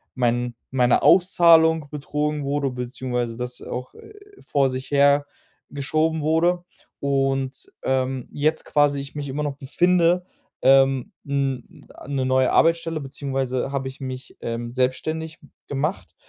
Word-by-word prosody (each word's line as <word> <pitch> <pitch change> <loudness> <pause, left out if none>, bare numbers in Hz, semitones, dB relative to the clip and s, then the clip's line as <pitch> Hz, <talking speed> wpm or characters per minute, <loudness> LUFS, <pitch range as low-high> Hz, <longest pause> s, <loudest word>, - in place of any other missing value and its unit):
mein 120 -1 0 0.2
meine 125 -2 +3
Auszahlung 165 -4 +5
betrogen 150 0 -2
wurde, 140 0 0
beziehungsweise 125 -1 -3
das 125 0 -5
auch 125 +1 -6 0.5
vor 135 -2 +2
sich 130 +2 -6
her 140 0 +4 0.5
geschoben 155 +3 0
wurde 170 +3 +2 0.4
und, 135 -1 -1
ähm, 130 -1 -1
jetzt 155 +2 0
quasi 145 -1 +2
ich 140 +2 -8
mich 145 -1 -4
immer 145 +3 -3
noch 140 -1 -3
befinde, 175 +5 +2 0.4
ähm, 135 +6 +4
'n 135 -3 -3 0.2
'ne 135 -2 -1
neue 130 0 +3
Arbeitsstelle 165 -1 +2
beziehungsweise 135 -1 -3
habe 135 -1 -2
ich 130 - -9
mich, 130 -1 -7
ähm, 120 0 -4
selbstständig 155 +5 -2 0.3
gemacht 150 +7 -3
140 Hz, 125 wpm, -23 LUFS, 130-155 Hz, 0.5 s, Auszahlung